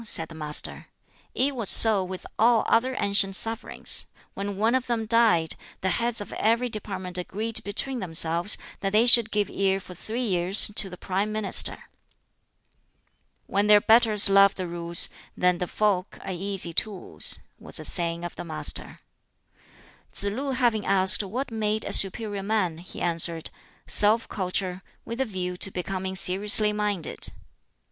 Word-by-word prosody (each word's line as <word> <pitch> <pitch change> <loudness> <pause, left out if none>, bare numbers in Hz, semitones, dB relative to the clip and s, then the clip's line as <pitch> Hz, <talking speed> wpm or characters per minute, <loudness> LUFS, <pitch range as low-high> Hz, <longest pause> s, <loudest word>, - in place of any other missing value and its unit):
said 165 -7 0
the - - -12
Master. 150 -1 -3 0.5
"It 275 +2 -1
was 230 -6 +1
so 215 -4 +9
with 185 0 -9
all 230 0 +2
other 255 +3 0
ancient 200 -1 +1
sovereigns: 225 +4 -3 0.3
when 200 0 -6
one 220 +3 0
of 260 -1 -2
them 230 -2 -3
died, 215 -8 +1 0.3
the 190 - -1
heads 235 -1 -2
of 205 - -8
every 235 +3 -1
department 190 -4 -6
agreed 215 +5 -3
between 245 +6 -3
themselves 170 +1 +1 0.2
that 195 0 -4
they 220 +3 +3
should 235 -2 +5
give 210 -1 -1
ear 195 0 -1
for 185 -1 -13
three 225 +7 -6
years 185 +1 +2
to 200 -2 +3
the 180 - -11
Prime 195 +3 -3
Minister." 215 -2 +2 1.6
"When 200 +1 -1
their 210 0 +6
betters 220 -1 +4
love 195 0 +5
the 185 - -5
Rules, 170 0 +2 0.3
then 180 -1 0
the 180 - -3
folk 200 -2 -2
are - - -7
easy 190 -1 -3
tools," 200 +2 0 0.2
was - - -2
a - - 0
saying 170 -1 +1
of 175 - -8
the - - -8
Master. 155 -2 -3 1.1
Tsz - - -7
lu 260 +7 -4
having 240 -5 -1
asked 190 0 +5
what 230 +7 -6
made 215 -1 -2
a - - -4
"superior 205 +1 +2
man," 195 -5 -2
he 175 - -11
answered, 170 -1 -1 0.3
"Self 215 +2 +5
culture, 185 -1 -4 0.2
with 230 +3 -6
a - - 0
view 185 -5 -6
to 190 - +1
becoming 190 +1 -6
seriously 205 +3 +3
minded." 205 -5 -4
200 Hz, 160 wpm, -24 LUFS, 180-220 Hz, 1.6 s, so